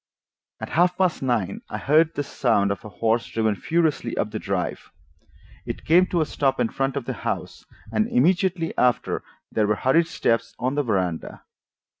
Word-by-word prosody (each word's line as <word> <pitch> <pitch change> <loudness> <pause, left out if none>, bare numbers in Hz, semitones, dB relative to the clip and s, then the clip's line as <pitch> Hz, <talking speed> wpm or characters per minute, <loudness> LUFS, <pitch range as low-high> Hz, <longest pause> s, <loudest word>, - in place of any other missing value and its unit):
At - - -6
half 175 +2 +2
past 185 -3 +1
nine 115 -8 -1
I 105 - -4
heard 155 +7 +3
the 145 - -1
sound 110 -7 +1
of 100 - -4
a 105 - -8
horse 115 +3 0
driven 110 -1 0
furiously 160 +3 0
up - - -1
the - - -3
drive. - - -3 0.7
It - - -6
came 180 +3 +5
to 175 - 0
a - - +2
stop 135 -3 0
in 120 -2 +2
front 135 0 -1
of 135 - -3
the - - -3
house, - - -4 0.3
and 215 0 +1
immediately 185 -7 +2
after 125 -1 +1 0.3
there 110 -2 +1
were 105 - +2
hurried 160 +9 +3
steps 115 -6 0
on 130 +2 -1
the 145 - +1
veranda. 95 - -2
135 Hz, 180 wpm, -24 LUFS, 110-165 Hz, 0.7 s, came